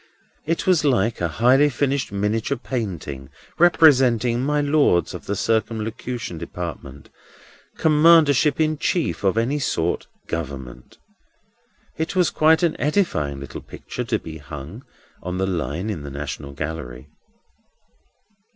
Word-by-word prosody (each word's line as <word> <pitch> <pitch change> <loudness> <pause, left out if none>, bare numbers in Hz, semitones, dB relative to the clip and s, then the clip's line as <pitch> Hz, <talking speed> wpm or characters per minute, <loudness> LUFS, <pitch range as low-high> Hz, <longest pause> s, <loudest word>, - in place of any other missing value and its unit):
It 165 +1 -1
was 180 -5 +3
like 120 -7 +1
a 85 - +1
highly 125 - +4
finished 140 -1 -1
miniature 105 +3 -1
painting 90 - -5 0.3
representing 130 -8 +4
My 150 +2 +1
Lords 145 - +2
of - - -9
the 100 - -1
Circumlocution 110 -2 -2
Department, 85 -5 -7 0.7
Commandership 155 -2 +5
in 155 -1 +1
Chief 170 - -1
of 95 +2 +2
any 130 +6 +1
sort, 85 - -1 0.2
Government. 65 -6 -6 1.0
It 160 +4 -2
was 180 -2 +3
quite 160 +2 +4
an 165 -2 +2
edifying 95 - 0
little 70 - -8
picture - - -7
to - - 0
be 80 -1 -9
hung 75 - -9 0.4
on 90 +1 -4
the 95 - 0
line 90 - -2
in 85 -8 -5
the 70 - -7
National 70 0 -6
Gallery. 70 -4 -6
110 Hz, 125 wpm, -22 LUFS, -, 1.0 s, Commandership